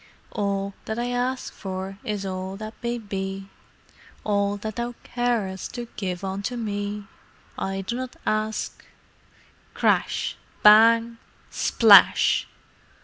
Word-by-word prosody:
"'All 200 -2 -2
that 220 - -3
I 240 +1 -1
a 250 +1 +1
a - - -9
sk - - -9
for 190 0 -6
is 205 -2 -3
all 190 0 -4
that 215 +1 -7
may 240 0 -2
be, 195 -2 -5 0.7
All 200 -1 +1
that 215 +2 -6
thou 240 0 -3
ca 245 - -7
a 240 -2 +3
a - - -4
rest 190 +3 -7
to 240 -1 -5
give 185 -2 -4
unto 195 +5 -3
me! 205 -2 -3 0.5
I 195 0 -3
do 215 +5 -4
not 255 0 -5
ask'"—— 215 0 -2 0.9
Crash! - - +1 0.3
Bang! 230 +2 +6 0.3
Splash! - - +6
210 Hz, 140 wpm, -24 LUFS, 195-235 Hz, 0.9 s, Bang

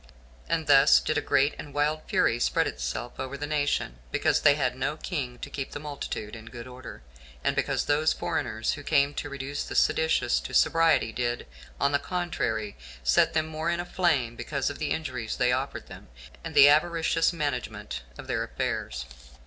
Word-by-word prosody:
And - - 0
thus 60 - +7
did - - 0
a - - -4
great 145 +3 +2
and 145 -2 -9
wild 150 +2 +1
fury 115 - +2
spread - - +2
itself 60 - -4
over 130 +1 -4
the 145 - -3
nation, 145 - -1
because - - +2
they 145 - +6
had 130 -4 0
no 140 +4 -2
king 135 -9 -4
to - - -7
keep 135 -2 -5
the - - -5
multitude 140 -7 -5
in 110 -1 -10
good 120 0 -8
order, 125 - -10 0.4
and - - +1
because - - 0
those 155 +2 +2
foreigners 110 -4 -1
who 145 - -5
came 145 -1 +2
to 145 - -4
reduce 140 +1 -4
the - - -7
seditious 160 - +2
to - - -6
sobriety 160 -8 +4
did, 120 0 -2 0.3
on 140 - +2
the 145 - +2
contrary, 140 - -2 0.3
set 60 - +3
them 155 0 +2
more 160 +1 -3
in 170 0 0
a 175 - -3
flame, 150 -11 +1
because 140 +2 -2
of 145 - -10
the 150 - -1
injuries 130 -8 -3
they 125 -1 +3
offered 130 +2 -2
them, - - -12 0.4
and - - -7
the 140 - +9
avaricious 165 +2 +3
management 125 - -3 0.2
of - - -9
their - - -1
affairs. 60 0 -3
140 Hz, 190 wpm, -27 LUFS, 120-150 Hz, 0.4 s, the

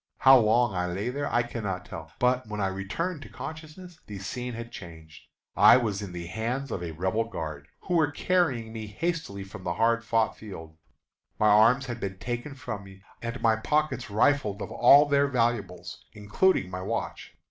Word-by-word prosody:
How 135 0 +7
long 115 0 +3
I 90 -1 -1
lay 95 +6 -3
there 145 +3 -3
I 120 0 +2
cannot 105 -6 -4
tell; - - -9
but 125 -1 +1
when 105 0 -5
I 95 -1 +1
returned 145 - -4
to - - -11
consciousness 160 +3 -9
the 105 - -7
scene 125 +5 -5
had 115 +1 -7
changed. 80 -6 -12 0.3
I 120 - +8
was 105 -5 -1
in 100 -3 -6
the 85 -1 -6
hands 115 +9 -3
of 90 - -3
a 85 - -4
Rebel 95 +7 -1
guard, 75 -9 -6
who 180 - -4
were 160 -4 +3
carrying 145 -9 0
me 110 -1 -6
hastily 155 - -3
from 95 -1 -11
the 85 -1 -2
hard 115 +2 +2
fought 115 0 +1
field. 80 -7 -10 0.6
My 105 - +4
arms 115 +6 +5
had 120 -2 -5
been 95 -2 -4
taken 120 +6 -5
from 110 -6 -6
me, 95 0 -15 0.2
and 115 +2 -4
my 110 -1 +4
pockets 150 +1 -1
rifled 105 -1 +2
of - - -8
all 145 +2 +7
their 140 -1 +3
valuables, 120 -7 -2
including 105 - +1
my 90 0 -5
watch. - - -4
115 Hz, 190 wpm, -27 LUFS, 95-135 Hz, 0.6 s, I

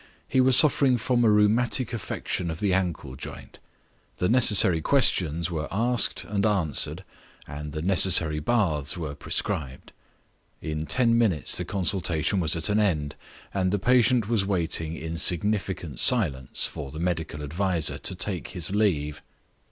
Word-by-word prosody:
He 130 - +2
was 130 0 +5
suffering 140 -4 +5
from 120 0 0
a 115 - +4
rheumatic 110 +4 +2
affection 90 -4 -4
of 80 0 -5
the 100 -3 0
ankle 85 -8 -2
joint. - - -10 0.6
The 90 - 0
necessary 105 -8 +4
questions 85 - +1
were 75 -3 -3
asked 115 +4 0
and 100 -1 -3
answered 95 -9 0 0.4
and 75 +1 -8
the 75 +1 -5
necessary 85 -4 +3
baths 80 - -1
were 80 -4 -5
prescribed. 70 -2 -5 0.7
In 75 0 -5
ten 115 -2 +3
minutes 95 -10 +1
the - - 0
consultation 95 -1 -1
was 80 -2 +1
at 80 -2 -2
an 105 +1 +1
end, 75 -9 -1 0.4
and 95 -2 0
the 105 - +1
patient 125 +1 +2
was 115 -3 0
waiting 85 -4 -2
in 80 +1 -6
significant 90 - -1
silence 75 - +1
for 70 - -6
the 75 +3 -9
medical 80 -4 -3
adviser 85 +2 -2
to - - -2
take 90 0 -3
his 90 -2 -6
leave. 75 -8 -1
90 Hz, 150 wpm, -25 LUFS, 80-105 Hz, 0.7 s, was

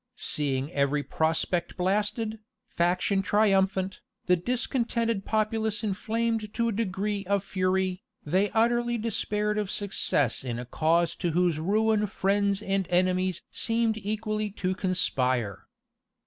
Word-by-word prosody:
Seeing 140 0 -1
every 145 -1 +1
prospect 160 +3 -1
blasted, 210 +4 0 0.3
faction 180 +3 +1
triumphant, 195 -2 +2 0.2
the 180 - +4
discontented 230 0 -1
populace 220 0 0
inflamed 220 +1 -1
to 235 -1 +1
a - - 0
degree 205 -1 -2
of 200 -1 +1
fury, 185 -1 0 0.2
they 190 +7 +2
utterly 240 +3 +2
despaired 210 -1 -1
of 205 -2 -2
success 150 - 0
in 120 -3 -3
a 125 - -5
cause 165 +5 +1
to 170 -2 -1
whose 175 -2 +2
ruin 210 +4 +2
friends 200 +1 +1
and 195 -2 0
enemies 185 0 +1
seemed 225 -1 +1
equally 215 0 -2
to 185 -2 -2
conspire. 130 - 0
195 Hz, 120 wpm, -27 LUFS, 180-215 Hz, 0.3 s, the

